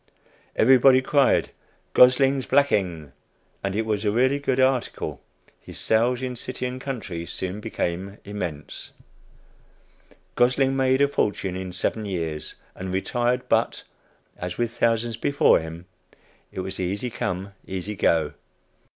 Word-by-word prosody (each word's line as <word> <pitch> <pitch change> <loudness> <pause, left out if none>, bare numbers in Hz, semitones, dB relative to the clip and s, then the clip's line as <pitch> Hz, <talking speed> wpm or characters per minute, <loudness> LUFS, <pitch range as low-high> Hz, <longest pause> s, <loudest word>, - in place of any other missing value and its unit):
Everybody 130 +2 +6
tried 140 +1 +2 0.4
"Gosling's 135 +1 +5
Blacking;" 90 - +1 0.5
and 100 0 -2
as - - 0
it 110 - 0
was 105 -1 -1
a 105 - +2
really 130 +6 +2
good 135 -2 0
article, 130 -1 0 0.4
his - - -11
sales 120 +3 +1
in 125 -1 -3
city 125 +1 -5
and 125 +1 -4
country 105 -11 -5
soon 95 +4 -4
became 95 0 -3
immense; 90 -8 -6 1.4
Gosling 130 +2 +2
made 130 0 +2
a 140 - +5
fortune 105 -8 -1
in 95 0 -5
seven 105 +4 -2
years, 80 -6 -4 0.2
and 95 0 -6
retired 120 +6 0
but, - - +1 0.5
as 90 0 -5
with 120 -1 0
thousands 115 -1 0
before 140 +4 +4
him, 80 +2 -8 0.7
it 95 - -4
was 95 +1 -5
"easy 100 +7 -2
come 95 -1 -3
easy 95 +3 -4
go." 80 -4 +2
110 Hz, 135 wpm, -24 LUFS, 95-130 Hz, 1.4 s, Everybody